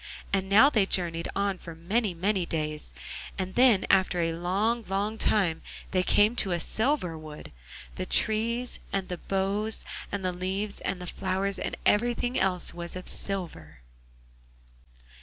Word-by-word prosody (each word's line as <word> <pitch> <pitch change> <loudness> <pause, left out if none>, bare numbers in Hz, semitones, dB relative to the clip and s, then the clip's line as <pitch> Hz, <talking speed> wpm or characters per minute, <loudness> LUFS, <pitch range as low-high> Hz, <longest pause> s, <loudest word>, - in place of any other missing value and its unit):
And 190 -1 +1
now 215 +7 +8
they 210 -7 +3
journeyed 170 -3 +1
on 200 -2 0
for 165 -2 -9
many, 195 +4 -1
many 190 +2 +1
days, 155 -2 -2 0.5
and 185 -1 -3
then 240 -6 +5
after 190 -2 +3
a 165 -1 +1
long, 200 +8 0
long 205 +3 -1
time 180 -6 +2 0.3
they 185 - +2
came 210 +5 +4
to 190 -6 +1
a 170 - 0
silver 220 - 0
wood. 155 -1 -10 0.5
The - - -3
trees, 230 +3 +1
and 195 -1 -2
the 180 -1 -4
boughs, 200 +3 -1 0.3
and 200 -2 -3
the 180 - 0
leaves, 190 +3 -3
and 195 - -3
the 180 - -6
flowers, 190 +2 -2
and - - -3
everything 240 +3 +2
else 185 -2 +1
was 170 0 -5
of 185 - -7
silver. 85 - -2
190 Hz, 155 wpm, -28 LUFS, 175-210 Hz, 0.5 s, now